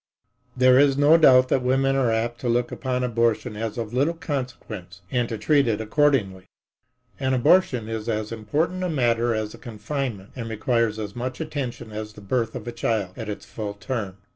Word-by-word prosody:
There 130 0 +6
is 140 -1 +4
no 145 +3 +6
doubt 130 -5 +6
that 130 - +2
women 135 +2 +2
are 130 -3 +2
apt 115 +1 -1
to 125 - -1
look 120 +1 +1
upon 125 -1 -2
abortion 115 -3 0
as 110 +1 -4
of 115 -1 -4
little 145 +7 +1
consequence 120 - -6
and 120 -2 0
to 115 - -3
treat 140 +5 +3
it 110 -2 0
accordingly. 110 -6 +1 0.7
An 130 -1 +1
abortion 125 -4 +3
is 110 0 -4
as 110 -1 -2
important 155 +12 -1
a 180 - 0
matter 120 -5 +1
as 110 -1 -3
a - - -12
confinement 115 -2 -5
and 115 -3 -5
requires 115 0 0
as 105 -2 -5
much 125 +1 -4
attention 140 -8 -5
as 105 0 -6
the 105 - -12
birth 115 +3 -1
of 110 - -7
a - - -2
child 110 -5 -1
at 110 -2 -6
its 105 - -6
full 105 -2 -6
term. 100 -4 -4
120 Hz, 190 wpm, -24 LUFS, 110-130 Hz, 0.7 s, There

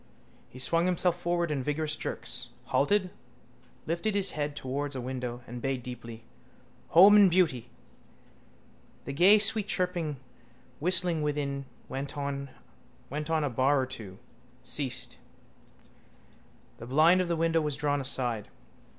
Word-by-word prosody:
He - - -13
swung 165 +7 +2
himself 180 -1 +1
forward 175 -1 0
in 140 -3 -1
vigorous 150 +3 -1
jerks, - - -5 0.2
halted, 185 +5 +1 0.7
lifted 170 +6 -1
his 195 -2 +2
head 145 -1 -3
towards 140 +1 -4
a - - -3
window 125 -1 -5
and 120 +1 -8
bayed 135 -1 -2
deeply: 115 -2 -9 0.6
—home 195 +6 +8
and 205 -2 +7
beauty. 155 -10 +1 1.4
The 140 - -5
gay 185 +8 +6
sweet 215 0 +2
chirping 175 -5 -2 0.6
whistling 175 -1 +2
within 145 -2 -2 0.2
went 135 +2 -5
on 140 -1 -4 0.6
a 150 0 -1
bar 135 +4 +2
or 130 - 0
two, 110 -8 -9 0.5
ceased. 135 -4 -2 1.6
The 115 - -9
blind 160 +7 +5
of 180 - -2
the 170 - 0
window 165 0 +1
was 150 -2 -1
drawn 145 -1 0
aside. 125 -5 -1
150 Hz, 130 wpm, -29 LUFS, 130-175 Hz, 1.6 s, home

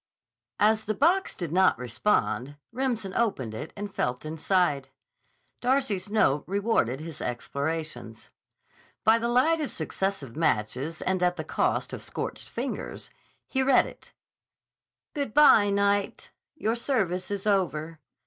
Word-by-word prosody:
As 220 +1 +3
the 215 - -1
box 350 - +2
did 170 -4 -5
not 185 +2 +4
respond, 125 - 0 0.2
Remsen 235 -6 -2
opened 140 - 0
it 110 - -6
and 205 -1 -5
felt 125 +3 -2
inside. 155 -3 0 0.7
Darcy's 245 -7 0
note 150 -10 +2
rewarded 195 - +1
his 160 -1 -8
explorations. 140 -1 -4 0.7
By 225 +1 +5
the 235 - -1
light 265 +7 +3
of 295 - -3
successive 190 -11 -3
matches 140 +1 -1
and 185 -1 0
at 180 0 +2
the 160 - -4
cost - - -1
of - - -5
scorched - - -5
fingers, - - -5 0.4
he 265 - 0
read 265 -1 +5
it: - - -12 1.0
Good 280 -7 -3
bye, 220 -9 +7
Knight. 200 0 0 0.2
Your 225 -6 0
service 195 -8 -1
is 200 -1 -3
over. 165 -6 0
190 Hz, 130 wpm, -27 LUFS, 155-225 Hz, 1.0 s, bye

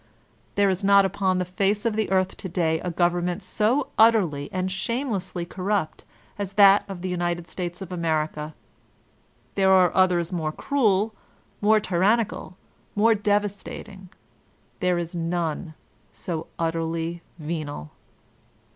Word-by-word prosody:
There 205 0 +4
is 190 0 0
not 200 0 +6
upon 190 -1 0
the 180 - 0
face 195 +4 0
of 225 -2 +1
the 220 -1 0
earth 190 0 +1
to 190 - -6
day 165 -2 +1
a 180 - -3
government 175 +2 0
so 235 +6 0
utterly 190 -11 +4
and 185 0 -2
shamelessly 195 -4 -2
corrupt 185 -2 -2 0.3
as 200 -1 -4
that 200 0 +7
of 185 -2 -7
the 185 - -2
United 175 -1 -2
States 175 0 -5
of 185 - -11
America. 155 -3 -2 1.0
There 190 -1 +3
are 185 -2 +5
others 180 -2 +3
more 160 -3 -1
cruel, 220 - +1 0.5
more 215 +1 +5
tyrannical, 200 +1 0 0.4
more 225 +2 +5
devastating; 205 -2 -2 0.7
there 180 -1 +1
is 170 0 -4
none 165 -1 -2 0.4
so 165 -3 -5
utterly 165 +1 -2 0.2
venal. 150 - -5
185 Hz, 130 wpm, -25 LUFS, 170-200 Hz, 1.0 s, that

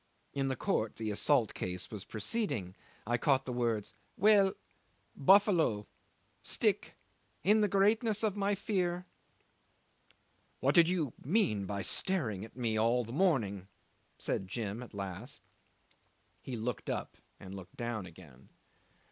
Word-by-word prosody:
In 135 -1 0
the 135 - 0
court 110 -2 -1
the 110 -1 -3
assault 120 +2 +2
case 90 -1 -4
was 105 -4 -6
proceeding. 105 - -2 0.3
I 120 +2 0
caught 135 0 +3
the 125 - -3
words: 115 -4 -1 0.2
"Well 200 -1 +5 0.6
buffalo 165 - +4 0.6
stick - - 0 0.5
in 215 +3 +5
the 210 - +4
greatness 210 +3 +2
of 210 -3 +1
my 205 0 +1
fear... 180 -3 -1 0.7
." - - -35 0.4
'"What - - +2
did 170 -2 +6
you 160 -9 0
mean 130 - +1
by 100 0 -3
staring 120 - -1
at 110 +2 -11
me 115 -3 0
all 120 +2 +3
the 115 +1 -8
morning?" 115 - +1 0.5
said 95 - -2
Jim 110 +1 -4
at 120 -4 -10
last. 100 +8 -6 1.0
He 130 - -5
looked 120 +2 -3
up - - -3 0.2
and 95 - -9
looked 95 -2 -10
down 115 -5 -3
again. 75 -7 -15
120 Hz, 140 wpm, -33 LUFS, -, 1.0 s, did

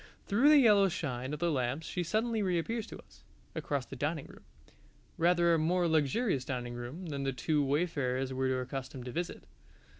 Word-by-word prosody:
Through 235 +8 +4
the 305 - +8
yellow 210 -7 +6
shine 130 -7 -3
of 150 - -3
the 170 +2 0
lamps 130 +2 -1
she 180 - -3
suddenly 220 +5 0
reappears 200 +5 -1
to - - -9
us, - - -22 0.3
across 140 -3 -2
the 135 - -9
dining 145 +3 -2
room - - -15 0.7
rather 170 0 +3
a 165 - +3
more 175 +3 +2
luxurious 160 - +1
dining 125 -2 -4
room 120 +10 -7
than 145 -4 -4
the 135 0 0
two 145 +4 0
wayfarers 135 -3 0
were 130 0 0
accustomed 130 0 -6
to 125 - -5
visit. 170 +6 -4
155 Hz, 180 wpm, -32 LUFS, 130-180 Hz, 0.7 s, the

